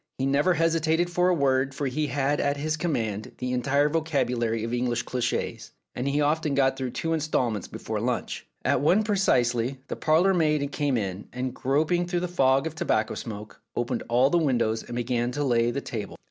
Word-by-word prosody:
He 130 Hz, -, -1 dB
never 145 Hz, +6 st, +3 dB
hesitated 165 Hz, +1 st, +1 dB
for 180 Hz, +1 st, +2 dB
a -, -, +4 dB
word, 135 Hz, -2 st, +1 dB
for 145 Hz, -, -2 dB
he 145 Hz, +3 st, -1 dB
had 140 Hz, +2 st, 0 dB
at 145 Hz, 0 st, 0 dB
his 155 Hz, +2 st, -1 dB
com 160 Hz, +1 st, -1 dB
mand 110 Hz, -3 st, -3 dB
the 125 Hz, 0 st, -3 dB
entire 140 Hz, +4 st, +2 dB
vocabulary 125 Hz, -8 st, 0 dB
of 115 Hz, +1 st, -3 dB
English 120 Hz, -1 st, 0 dB
cliches, 125 Hz, -2 st, -3 dB, 0.2 s
and 125 Hz, -, -3 dB
he 140 Hz, +1 st, +1 dB
often 150 Hz, 0 st, +1 dB
got 135 Hz, -1 st, +3 dB
through 130 Hz, -1 st, -3 dB
two 165 Hz, +6 st, -2 dB
instalments 125 Hz, -, -1 dB
before -, -, -4 dB
lunch. -, -, -3 dB, 0.2 s
At -, -, +2 dB
one 185 Hz, +9 st, +4 dB
precisely 130 Hz, -, +1 dB
the -, -, -2 dB
parlourmaid 155 Hz, -3 st, +2 dB
came 145 Hz, -4 st, 0 dB
in, 95 Hz, -2 st, -4 dB
and 125 Hz, 0 st, -3 dB
groping 155 Hz, +7 st, +1 dB
through 175 Hz, -1 st, -1 dB
the 180 Hz, -, -1 dB
fog 135 Hz, -5 st, +2 dB
of 160 Hz, -, -3 dB
tobacco 110 Hz, -8 st, 0 dB
smoke, 105 Hz, -2 st, -8 dB
opened 120 Hz, 0 st, -1 dB
all 125 Hz, +4 st, +4 dB
the 175 Hz, -, +4 dB
windows 120 Hz, -7 st, +1 dB
and 120 Hz, -, -8 dB
began 120 Hz, 0 st, 0 dB
to 145 Hz, -, -1 dB
lay 120 Hz, -3 st, +2 dB
the 140 Hz, +3 st, -2 dB
table. 105 Hz, -6 st, -6 dB
135 Hz, 195 wpm, -26 LUFS, 120-155 Hz, 0.2 s, a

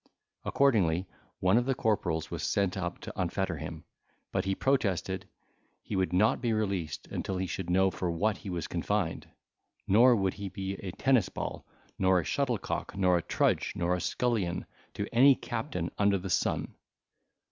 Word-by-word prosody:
Accordingly 95 Hz, -11 st, +2 dB, 0.4 s
one 95 Hz, +4 st, +4 dB
of 120 Hz, -, -2 dB
the 135 Hz, -, +2 dB
corporals 85 Hz, -9 st, 0 dB
was -, -, -4 dB
sent 100 Hz, -3 st, +1 dB
up 90 Hz, -2 st, -3 dB
to -, -, -7 dB
unfetter -, -, -1 dB
him, -, -, -7 dB, 0.5 s
but 95 Hz, 0 st, 0 dB
he 95 Hz, 0 st, 0 dB
protested 95 Hz, -, 0 dB, 0.6 s
he 105 Hz, -, -4 dB
would 95 Hz, -1 st, +1 dB
not 105 Hz, +7 st, +3 dB
be 120 Hz, -3 st, +1 dB
released 95 Hz, -8 st, -2 dB
until 95 Hz, -, -2 dB
he 95 Hz, -, -1 dB
should 90 Hz, 0 st, -4 dB
know 95 Hz, +1 st, +4 dB
for 90 Hz, 0 st, -2 dB
what 100 Hz, +5 st, 0 dB
he 100 Hz, -, -8 dB
was 85 Hz, -3 st, -3 dB
confined; 90 Hz, 0 st, -1 dB, 0.6 s
nor 120 Hz, +5 st, +6 dB
would 95 Hz, -3 st, +1 dB
he 100 Hz, -1 st, -6 dB
be 95 Hz, 0 st, -4 dB
a 95 Hz, -, -6 dB
tennisball, 130 Hz, -3 st, 0 dB, 0.3 s
nor 95 Hz, -1 st, +4 dB
a -, -, -2 dB
shuttlecock, -, -, -2 dB
nor 90 Hz, -2 st, +4 dB
a -, -, -5 dB
trudge, -, -, +1 dB
nor 85 Hz, +1 st, +1 dB
a 90 Hz, -, -1 dB
scullion, 110 Hz, -9 st, 0 dB, 0.3 s
to 100 Hz, -, -2 dB
any 135 Hz, +3 st, +7 dB
captain 115 Hz, -, -4 dB
under 100 Hz, -1 st, +4 dB
the 95 Hz, 0 st, -5 dB
sun. -, -, 0 dB
95 Hz, 170 wpm, -30 LUFS, 90-110 Hz, 0.6 s, any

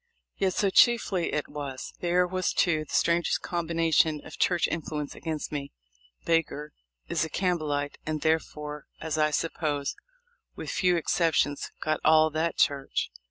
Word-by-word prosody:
Yet 190 Hz, -2 st, 0 dB
so, 200 Hz, -2 st, +2 dB
chiefly, 210 Hz, -6 st, +4 dB
it 150 Hz, -, -1 dB
was. 140 Hz, -3 st, -6 dB
There 180 Hz, +1 st, +2 dB
was, 185 Hz, 0 st, -1 dB
too, 155 Hz, -4 st, +2 dB
the -, -, -14 dB
strangest 170 Hz, -1 st, +2 dB
combination 165 Hz, -2 st, +1 dB
of -, -, -10 dB
church 175 Hz, -2 st, +3 dB
influence 150 Hz, -2 st, -4 dB
against 160 Hz, -2 st, -4 dB
me. 140 Hz, -2 st, -5 dB, 0.5 s
Baker 150 Hz, -2 st, 0 dB, 0.3 s
is -, -, 0 dB
a 160 Hz, -, -3 dB
Campbell 175 Hz, -4 st, 0 dB
ite, 145 Hz, 0 st, -2 dB
and 155 Hz, -1 st, -3 dB
therefore 150 Hz, -2 st, -1 dB
as 155 Hz, -1 st, -2 dB
I 155 Hz, 0 st, +4 dB
suppose, 150 Hz, -2 st, -1 dB, 0.6 s
with -, -, -5 dB
few 180 Hz, -2 st, +2 dB
excep 165 Hz, 0 st, +1 dB
tions, 145 Hz, 0 st, +1 dB
got 155 Hz, 0 st, 0 dB
all 155 Hz, 0 st, +5 dB
that 160 Hz, +2 st, -1 dB
church. 140 Hz, -1 st, +1 dB
155 Hz, 155 wpm, -28 LUFS, 150-170 Hz, 0.6 s, all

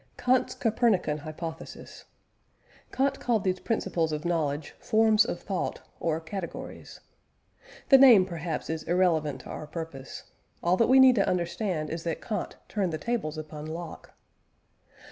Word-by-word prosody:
KANT'S 255 Hz, 0 st, +1 dB
COPERNICAN 215 Hz, -9 st, +1 dB
HYPOTHESIS. 160 Hz, +2 st, -8 dB, 0.9 s
Kant 275 Hz, +1 st, 0 dB
called 230 Hz, -4 st, 0 dB
these 185 Hz, -1 st, 0 dB
principles 180 Hz, -8 st, -1 dB
of 150 Hz, +2 st, -4 dB
knowledge, 155 Hz, -3 st, -1 dB
forms 220 Hz, 0 st, +4 dB
of 205 Hz, -, -4 dB
thought 195 Hz, -3 st, -3 dB, 0.2 s
or 160 Hz, -1 st, 0 dB
categories. 170 Hz, +2 st, -7 dB, 0.9 s
The 270 Hz, -, +8 dB
name, 240 Hz, -8 st, +8 dB
perhaps, 170 Hz, -3 st, -4 dB
is 160 Hz, 0 st, -3 dB
irrelevant 165 Hz, -5 st, +1 dB
to -, -, -10 dB
our 155 Hz, -, -7 dB
purpose; 155 Hz, -4 st, -7 dB, 0.4 s
all 175 Hz, +2 st, +3 dB
that 230 Hz, -, +3 dB
we 265 Hz, +1 st, +7 dB
need 260 Hz, -1 st, +8 dB
to 195 Hz, -, +3 dB
understand 170 Hz, -2 st, -2 dB
is 165 Hz, 0 st, -4 dB
that 165 Hz, -, -2 dB
Kant 210 Hz, -5 st, -4 dB
turned 195 Hz, -5 st, -1 dB
the 155 Hz, -, -2 dB
tables 200 Hz, -8 st, -3 dB
upon 155 Hz, 0 st, -7 dB
Locke. 165 Hz, +1 st, -8 dB
175 Hz, 145 wpm, -28 LUFS, 160-215 Hz, 0.9 s, The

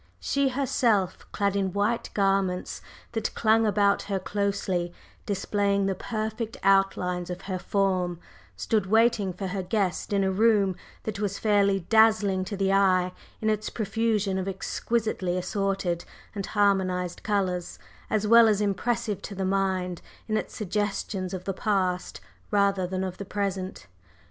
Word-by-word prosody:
She 280 Hz, -1 st, +1 dB
herself, 235 Hz, -7 st, 0 dB
clad 200 Hz, -1 st, 0 dB
in 190 Hz, -2 st, 0 dB
white 210 Hz, +3 st, 0 dB
garments 195 Hz, -2 st, 0 dB, 0.3 s
that 225 Hz, -2 st, -3 dB
clung 225 Hz, 0 st, +3 dB
about 200 Hz, -1 st, +3 dB
her 195 Hz, -, +1 dB
closely, 190 Hz, -3 st, -1 dB, 0.4 s
displaying 200 Hz, 0 st, +1 dB
the 195 Hz, -, +1 dB
perfect 220 Hz, +3 st, -4 dB
outlines 180 Hz, -2 st, +2 dB
of 180 Hz, +1 st, -5 dB
her 185 Hz, -2 st, -4 dB
form, 185 Hz, -3 st, 0 dB, 0.4 s
stood 195 Hz, -, 0 dB
waiting 220 Hz, -2 st, +3 dB
for 180 Hz, +2 st, -6 dB
her 190 Hz, +1 st, -2 dB
guest 195 Hz, -1 st, -1 dB
in 200 Hz, -1 st, +2 dB
a 190 Hz, -, +1 dB
room 200 Hz, -2 st, +3 dB, 0.3 s
that 210 Hz, -2 st, -4 dB
was 200 Hz, -2 st, -1 dB
fairly 200 Hz, -2 st, +2 dB
dazzling 215 Hz, -1 st, +4 dB
to 200 Hz, +2 st, -5 dB
the 195 Hz, 0 st, +1 dB
eye 185 Hz, -2 st, +3 dB, 0.3 s
in 220 Hz, -, +1 dB
its 215 Hz, 0 st, -2 dB
profusion 215 Hz, -2 st, 0 dB
of 190 Hz, -, -3 dB
exquisitely 195 Hz, -1 st, -1 dB
assorted 195 Hz, -2 st, -1 dB, 0.3 s
and 200 Hz, -2 st, -4 dB
harmonized 185 Hz, -4 st, +1 dB
colors, 185 Hz, -4 st, -1 dB, 0.3 s
as 215 Hz, -1 st, +1 dB
well 230 Hz, +1 st, +7 dB
as 210 Hz, -2 st, +3 dB
impressive 210 Hz, +1 st, -1 dB
to 200 Hz, -, -7 dB
the 190 Hz, 0 st, -2 dB
mind 185 Hz, -2 st, 0 dB, 0.3 s
in 215 Hz, -, 0 dB
its -, -, -3 dB
suggestions 200 Hz, -2 st, -2 dB
of 185 Hz, -1 st, -5 dB
the 195 Hz, +1 st, -2 dB
past 185 Hz, -3 st, -1 dB, 0.3 s
rather 200 Hz, -3 st, +2 dB
than 185 Hz, +1 st, -2 dB
of 185 Hz, -1 st, -5 dB
the -, -, -3 dB
present. 195 Hz, -, -3 dB
195 Hz, 150 wpm, -27 LUFS, 185-210 Hz, 0.4 s, well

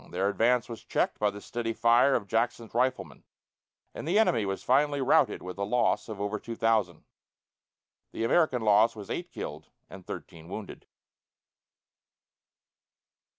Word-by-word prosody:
Their 95 Hz, +3 st, 0 dB
advance 115 Hz, +4 st, +2 dB
was 115 Hz, -2 st, -9 dB
checked -, -, -1 dB
by 105 Hz, -, +2 dB
the 100 Hz, -, -8 dB
steady 115 Hz, +2 st, -4 dB
fire 120 Hz, +4 st, +4 dB
of 110 Hz, -, -1 dB
Jackson's 115 Hz, +1 st, -1 dB
riflemen, 130 Hz, +2 st, -1 dB, 0.7 s
and -, -, -7 dB
the 180 Hz, +5 st, +2 dB
enemy 120 Hz, -, +3 dB
was 95 Hz, 0 st, -4 dB
finally 145 Hz, +2 st, +2 dB
routed 140 Hz, +2 st, +2 dB
with 90 Hz, +1 st, -8 dB
a -, -, 0 dB
loss 120 Hz, +2 st, +1 dB
of 105 Hz, -2 st, -6 dB
over 105 Hz, +1 st, -2 dB
two 115 Hz, -, -7 dB
thousand. 110 Hz, -6 st, 0 dB, 1.1 s
The -, -, -4 dB
American 125 Hz, -1 st, +2 dB
loss 110 Hz, +2 st, +4 dB
was 105 Hz, -2 st, -8 dB
eight -, -, -4 dB
killed -, -, -7 dB, 0.2 s
and -, -, -10 dB
thirteen 80 Hz, 0 st, -9 dB
wounded. 100 Hz, +1 st, -8 dB
115 Hz, 150 wpm, -28 LUFS, 105-125 Hz, 1.1 s, fire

